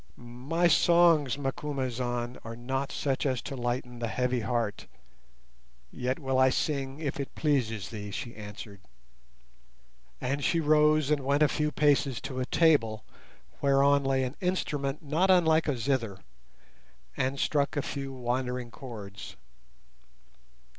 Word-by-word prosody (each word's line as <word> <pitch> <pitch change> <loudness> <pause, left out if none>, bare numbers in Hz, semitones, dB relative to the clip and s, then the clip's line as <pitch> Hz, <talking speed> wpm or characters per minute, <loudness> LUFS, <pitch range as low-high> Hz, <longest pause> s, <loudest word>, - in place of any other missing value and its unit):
"My 130 +9 -1
songs, 165 -5 +4
Macumazahn, 130 -3 -3
are 115 0 -7
not 135 +3 -3
such 135 -2 -1
as 130 -3 0
to 135 - -5
lighten 120 0 -3
the 120 - -2
heavy 125 +2 0
heart, 115 -2 -2 1.0
yet 130 +1 -2
will 135 -3 0
I 130 0 +6
sing 135 0 -1
if 145 -3 -3
it 140 - -5
pleases 115 -10 0
thee," 105 -2 -6
she 115 +4 -6
answered; 105 -1 -9 1.4
and 140 +3 -2
she 165 - +2
rose 150 -1 +3
and 145 -2 +1
went 140 +3 +3
a - - +6
few 150 +1 -1
paces 145 -4 +2
to 135 -1 -5
a 130 - -2
table 115 -10 +3 0.6
whereon 140 0 +4
lay 135 -1 +1
an 130 +2 -4
instrument 150 -6 -1
not 160 +6 +1
unlike 165 -4 +4
a 145 -4 0
zither, 115 -5 -1 1.0
and 135 +1 -1
struck 145 0 +1
a 145 - 0
few 135 -1 -5
wandering 125 -1 -3
chords. 105 -7 -9
135 Hz, 135 wpm, -29 LUFS, 120-145 Hz, 1.4 s, I